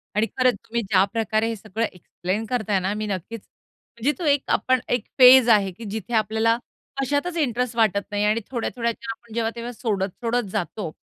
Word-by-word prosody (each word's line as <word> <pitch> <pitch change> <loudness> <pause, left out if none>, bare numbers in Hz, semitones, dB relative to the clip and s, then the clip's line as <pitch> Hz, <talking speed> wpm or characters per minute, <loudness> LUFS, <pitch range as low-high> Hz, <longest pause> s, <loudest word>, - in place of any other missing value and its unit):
आणि 215 +2 +2
खरंच 255 -1 +4
तुम्ही 235 +1 -2
ज्याप्रकारे 215 +2 +1
हे 230 - -2
सगळं 220 +2 -3
एक्सप्लेन 185 +4 -4
करताय 215 -5 0
ना, 190 +2 -1
मी 215 0 -3
नक्कीच 200 +3 -5 0.6
म्हणजे 260 +6 +1
तो 350 - -4
एक 285 -2 +3
आपण 255 0 +2
एक 245 -3 0
फेज 255 -2 +8
आहे 200 -4 +4
की 225 +5 -11
जिथे 220 +1 -5
आपल्याला 220 +1 +2 0.4
कशातच 285 +6 -1
इंटरेस्ट 250 -4 0
वाटत 215 -4 +2
नाही 205 0 0
आणि 215 +2 +2
थोड्या-थोड्या 235 -1 -1
ज्या 230 0 -7
आपण 225 0 -12
जेव्हा-तेव्हा 235 +1 -2
सोडत-सोडत 225 +2 -2
जातो, 185 -2 -3
225 Hz, 175 wpm, -23 LUFS, 210-240 Hz, 0.6 s, फेज